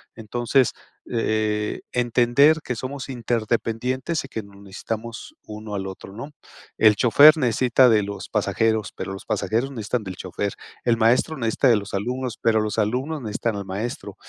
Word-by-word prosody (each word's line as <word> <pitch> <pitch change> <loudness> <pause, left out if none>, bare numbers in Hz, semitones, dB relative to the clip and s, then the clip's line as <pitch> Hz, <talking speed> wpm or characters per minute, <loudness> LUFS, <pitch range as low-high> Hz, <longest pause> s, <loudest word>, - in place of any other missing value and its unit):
Entonces, 120 +3 +1 0.4
eh, 110 -2 -1
entender 125 +6 +3
que 125 - -3
somos 135 +3 -6
interdependientes, 120 +4 -1
y - - -12
que 110 - -4
nos 100 0 -16
necesitamos 110 +3 -7
uno 105 0 -7
al 95 -1 -3
otro, 95 0 -9
¿no? 130 +8 -8 0.5
El 110 -2 +6
chofer 145 +7 +7
necesita 125 0 +3
de 105 -2 +4
los 100 0 -6
pasajeros, 110 -2 0
pero - - -5
los 95 - -9
pasajeros 115 +4 -1
necesitan 115 -1 -3
del 95 -1 -6
chofer. 95 +2 -4 0.3
El 120 -1 +4
maestro 120 +7 +2
necesita 115 +2 +1
de 120 - +6
los 100 -1 -7
alumnos, 125 +4 -3
pero 110 -2 +3
los 105 +1 -3
alumnos 130 +8 -1
necesitan 110 0 -2
al 100 - -5
maestro. 105 +6 -5
115 Hz, 160 wpm, -23 LUFS, 105-125 Hz, 0.5 s, chofer